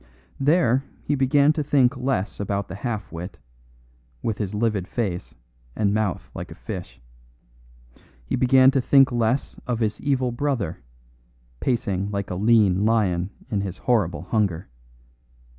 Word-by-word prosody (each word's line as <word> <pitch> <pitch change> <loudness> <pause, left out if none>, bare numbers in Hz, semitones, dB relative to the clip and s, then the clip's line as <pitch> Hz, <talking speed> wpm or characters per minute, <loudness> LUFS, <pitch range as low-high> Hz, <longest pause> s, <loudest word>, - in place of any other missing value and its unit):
There 135 -3 +3 0.2
he 145 - 0
began 140 +2 +4
to 155 - -1
think 140 -3 +3
less 125 -5 -2
about 100 0 -2
the - - -6
half 110 +1 -4
wit, 85 +1 -7 0.9
with 110 -3 -2
his 105 -1 -3
livid 105 -4 0
face 100 -8 -3 0.4
and 100 -1 +1
mouth 105 -4 -1
like - - -7
a - - -10
fish. - - -7 1.3
He - - -1
began 130 +1 +5
to 135 - +1
think 135 +1 +5
less 120 +2 0
of 125 -2 0
his 110 -2 -1
evil 130 -3 +1
brother, 120 - -2 0.8
pacing 100 - -1
like 100 -2 -3
a - - -2
lean 105 -2 +3
lion 100 -5 +1 0.2
in 100 -3 0
his 95 -2 -5
horrible 100 -10 0
hunger. 95 -3 -1
110 Hz, 140 wpm, -24 LUFS, 100-130 Hz, 1.3 s, began